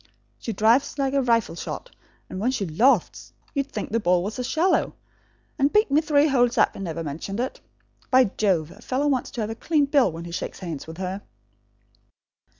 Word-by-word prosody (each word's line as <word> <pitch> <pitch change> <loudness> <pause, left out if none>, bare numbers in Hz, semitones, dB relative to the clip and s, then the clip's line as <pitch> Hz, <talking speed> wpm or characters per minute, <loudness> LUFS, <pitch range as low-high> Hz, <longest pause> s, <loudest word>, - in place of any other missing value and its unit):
She 230 - -4
drives 225 +8 +2
like 270 -1 0
a 280 - +3
rifle 230 -7 +1
shot, - - -6 0.4
and 185 - -6
when 225 +5 +1
she 250 -6 -1
lofts, 220 - +1 0.2
you'd 280 -2 -2
think 210 - -5
the 230 - +1
ball 180 -3 +2
was 215 +5 -5
a - - -1
swallow; 335 +8 +1 0.6
and 280 +2 +3
beat 425 -7 +3
me 295 +2 +4
three 300 -2 +3
holes 245 -4 +2
up - - +4
and 195 - -7
never 165 -2 -4
mentioned 165 +8 -5
it. 255 +2 -3 0.5
By 260 0 +6
Jove, 175 -7 +1
a - - -15
fellow 270 +3 -1
wants 270 -4 0
to 240 - -5
have 215 +1 -2
a - - -2
clean 295 +5 +1
bill 275 - +3
when 165 +1 -8
he 170 - -8
shakes 170 - -5
hands 165 -7 -6
with 160 0 -9
her!" 190 +1 -4
235 Hz, 205 wpm, -24 LUFS, 185-275 Hz, 0.6 s, By